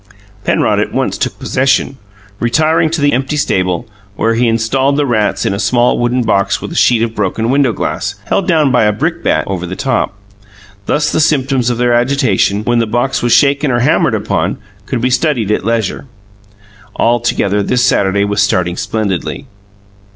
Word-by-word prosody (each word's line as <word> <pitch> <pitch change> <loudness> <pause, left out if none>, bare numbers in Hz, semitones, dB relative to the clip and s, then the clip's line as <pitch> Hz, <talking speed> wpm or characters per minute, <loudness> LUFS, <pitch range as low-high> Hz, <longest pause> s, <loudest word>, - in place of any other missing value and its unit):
Penrod - - +1
at - - -1
once - - -1
took - - -3
possession, 130 +1 0 0.4
retiring 155 +7 +2
to 165 -1 -2
the 145 0 +2
empty 135 +4 -1
stable, 95 - -1 0.3
where 115 +2 +1
he 120 +1 +1
installed 130 +5 +1
the 145 - +1
rats 110 -5 0
in - - 0
a 100 - -4
small 120 +2 +2
wooden 120 +1 0
box 100 -3 +1
with - - -7
a - - -7
sheet 115 -2 +3
of 115 -1 -2
broken 110 +3 -1
window 135 -2 +2
glass 105 - -3
held 195 - -1
down 155 -6 +3
by 120 -4 +3
a 105 - +3
brickbat 105 - -1
over 90 -2 -4
the 95 - -5
top. 130 -6 -1 0.7
Thus 150 0 +1
the - - 0
symptoms 135 -5 +1
of 120 - -1
their 120 0 +1
agitation, 120 -5 +1
when 120 +1 +1
the 115 - 0
box 120 +4 -1
was 120 - 0
shaken 140 +2 +3
or 120 -1 +1
hammered 125 - +2
upon, - - -1 0.3
could 125 - -2
be 125 +1 0
studied 125 -7 0
at 105 - 0
leisure. 115 +3 -2 0.9
Altogether 115 -4 +1
this 125 +4 0
Saturday 100 +1 +2
was 100 +1 0
starting 90 -3 0
splendidly. 110 -1 -3
120 Hz, 180 wpm, -14 LUFS, 105-135 Hz, 0.9 s, sheet